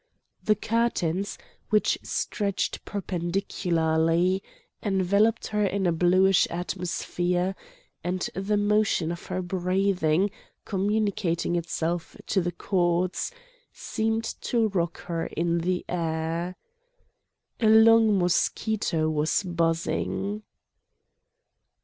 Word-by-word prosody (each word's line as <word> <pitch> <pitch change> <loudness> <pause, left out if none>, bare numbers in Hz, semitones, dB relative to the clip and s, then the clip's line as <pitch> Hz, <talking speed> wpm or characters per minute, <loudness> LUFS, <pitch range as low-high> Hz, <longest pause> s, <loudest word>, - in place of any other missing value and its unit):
The 215 - +3
curtains, 205 -4 -1 0.3
which 215 -1 +2
stretched 200 -3 -2
perpendicularly, 175 -2 0 0.4
enveloped 200 +3 +2
her 210 -1 +1
in 195 -1 0
a 175 - +3
bluish 185 +3 +4
atmosphere, 180 +1 -2 0.5
and 180 0 -1
the 200 +2 0
motion 205 -5 +2
of 170 - -7
her 185 0 -2
breathing, 185 -1 +1 0.3
communicating 200 -4 0
itself 170 0 -2
to 195 - +1
the 175 0 -1
cords, 175 - 0 0.4
seemed 225 +1 -1 0.2
to 230 -3 +1
rock 175 -4 -2
her 165 -1 -3
in 170 +1 0
the 180 +2 -1
air. 165 +1 -2 1.0
A 220 - +3
long 220 -1 +6
mosquito 175 -1 +1
was 155 +4 +1
buzzing. 175 +4 -1
185 Hz, 95 wpm, -26 LUFS, 170-205 Hz, 1.0 s, long